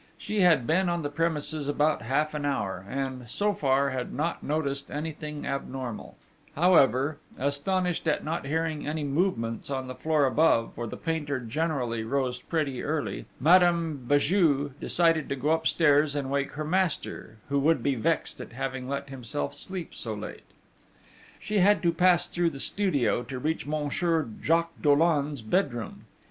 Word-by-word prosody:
She 210 - -3
had 165 -9 +5
been 180 +5 +2
on 175 -2 -1
the 145 - -3
premises 155 -1 -1
about 150 +2 +1
half 150 +6 0
an 150 -1 -3
hour, 100 -10 -2
and, 130 -2 -4
so 205 - +1
far, 140 -3 +1
had 130 -1 -3
not 160 +5 -2
noticed 140 -2 -2
anything 150 0 -5
abnormal; 130 -4 -5 0.4
however, 145 -4 +4 0.2
astonished 165 +6 -1
at 150 - +1
not 155 -2 -3
hearing 160 0 -1
any 155 0 -2
movements 140 - -1
on 135 -2 -2
the 130 - -6
floor 155 +1 +1
above, 130 -4 +3
for 120 0 -5
the - - -7
painter 150 -5 -2
generally 125 -2 -2
rose 125 +1 -1
pretty 140 -6 -2
early, 155 +1 -3
Madame 165 -4 +3
Béju 145 -1 +3
decided 165 -3 +2
to 140 - -1
go 140 +3 0
upstairs 155 -2 +3
and 135 -2 -2
wake 140 0 -1
her 155 +2 -4
master, 165 - -1
who 140 0 +2
would 160 +4 +2
be 140 - +2
vexed 115 -4 -1
at - - -10
having 130 0 -4
let 140 0 -3
himself 115 - -4
sleep 185 -3 -4
so 110 -2 -4
late. 105 - -7 1.0
She 210 -1 -1
had 205 +2 +4
to 170 - +4
pass 175 +1 +4
through 175 -1 +1
the 140 -4 -8
studio 145 - +1
to 130 - -6
reach 155 +3 -2
Monsieur 155 +1 0
Jacques 165 +1 +1
Dollon's 145 -3 +2
bedroom. 120 - -1
145 Hz, 160 wpm, -27 LUFS, 135-165 Hz, 1.0 s, had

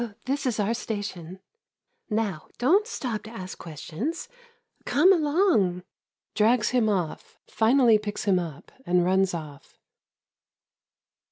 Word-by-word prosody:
This 275 +1 -1
is 230 -3 -1
our 210 +2 +1
station. 200 -6 -5 0.7
Now, 210 -7 -2
don't 370 - +3
stop 245 - -4
to 220 - -11
ask 185 -5 -8
questions. 175 - -5 0.6
Come 360 +7 +5
along. 295 - +2 0.5
[Drags 220 +2 +3
him 240 -4 +2
off, 180 -6 -3
finally 230 -1 +4
picks 205 -1 -5
him 195 -3 +3
up, 160 -5 -7
and 180 -3 +2
runs 190 0 +2
off. 150 -4 -10
215 Hz, 115 wpm, -26 LUFS, 180-255 Hz, 0.7 s, Come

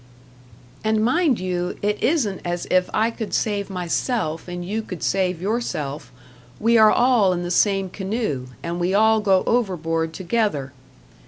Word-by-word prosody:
And 220 0 +2
mind 305 -1 +2
you, 180 -1 -2
it 210 +1 0
isn't 240 - +1
as 175 0 -3
if 185 0 +3
I 220 +2 +1
could 220 -2 -4
save 205 -2 -1
myself 180 -1 -2
and 175 0 -5
you 215 +4 -2
could 185 -6 -8
save 185 -2 0
yourself; 175 - -3 0.5
we 230 +2 +3
are 215 -1 +7
all 240 -7 +4
in 175 0 -3
the 175 - -4
same 195 +1 +2
canoe, 190 - -3 0.2
and 170 +1 -3
we 180 +2 0
all 220 +1 +4
go 195 -3 +3
overboard 165 -8 0
together. 170 - -1
195 Hz, 155 wpm, -22 LUFS, 175-220 Hz, 0.5 s, are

